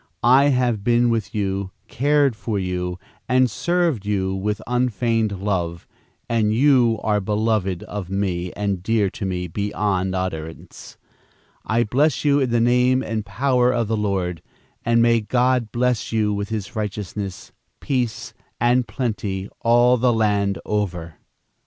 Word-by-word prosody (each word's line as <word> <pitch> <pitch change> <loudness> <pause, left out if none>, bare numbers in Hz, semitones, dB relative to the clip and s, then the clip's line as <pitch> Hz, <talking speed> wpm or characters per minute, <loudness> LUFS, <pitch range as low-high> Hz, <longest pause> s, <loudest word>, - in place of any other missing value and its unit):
I 130 +4 +6
have 125 -6 +1
been 120 +1 +3
with 115 -3 -2
you, 100 -2 -1 0.2
cared 140 -1 +2
for 105 +1 -3
you, 90 -1 -3 0.3
and 130 -1 +3
served 170 - 0
you 95 -2 -1
with 105 +2 -2
unfeigned 115 -4 0
love, 85 -4 -2 0.4
and 110 -2 +1
you 120 -2 +4
are 105 -1 +2
beloved 105 -3 0
of 100 -4 -6
me 90 -2 -2
and 100 -3 -2
dear 105 -1 +1
to 100 - -5
me 90 -1 -2
beyond 95 0 -1
utterance. 80 -3 -6 0.7
I 115 +2 +1
bless 135 +6 +1
you 145 -1 +4
in 130 -3 +1
the 120 0 +2
name 125 +2 +3
and 110 -3 -3
power 125 +4 +1
of 115 -3 0
the 110 - 0
Lord, 95 -6 -2 0.4
and 115 0 +3
may 115 -1 +3
God 125 0 +1
bless 125 -1 0
you 110 -2 +1
with 100 +1 -3
his 105 -3 -5
righteousness, 105 -2 -5 0.3
peace 125 -5 -2 0.3
and 120 +1 +2
plenty 105 -4 -3
all 120 +2 +4
the 125 +1 +3
land 105 -3 +1
over." 90 -6 -3
110 Hz, 145 wpm, -22 LUFS, 100-120 Hz, 0.7 s, I